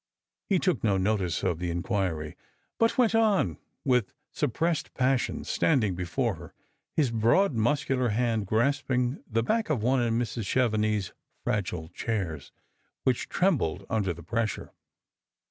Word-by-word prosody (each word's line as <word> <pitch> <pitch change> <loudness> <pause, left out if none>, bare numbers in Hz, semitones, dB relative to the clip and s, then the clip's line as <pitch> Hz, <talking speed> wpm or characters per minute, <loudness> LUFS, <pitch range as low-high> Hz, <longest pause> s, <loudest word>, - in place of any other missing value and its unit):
He 195 - +4
took 180 -6 0
no 100 -4 +3
notice 95 -2 0
of 85 -3 0
the 90 -1 -2
inquiry, 85 -3 -2 0.4
but 230 0 +3
went 235 -3 +4
on, 210 - +2 0.3
with 125 -6 +1 0.2
suppressed 155 +3 -1
passion, 130 -1 +1
standing 120 - +2
before 90 -1 -1
her, - - -12 0.4
his 140 -7 +2
broad 120 - +3
muscular 125 +2 +1
hand 110 -2 0
grasping 125 +3 +1
the 115 -1 +1
back 220 - 0
of 130 -9 0
one 130 +2 +3
of 120 -1 +1
Mrs. 115 -1 -1
Chevenix's 110 -5 +1 0.3
fragile 90 -6 -2
chairs, 90 -12 -3 0.5
which 130 -2 0
trem 185 -2 +3
bled 90 +3 -3
under 105 -5 +1
the 85 0 -8
pressure. 115 +3 -2
115 Hz, 140 wpm, -28 LUFS, 95-135 Hz, 0.5 s, He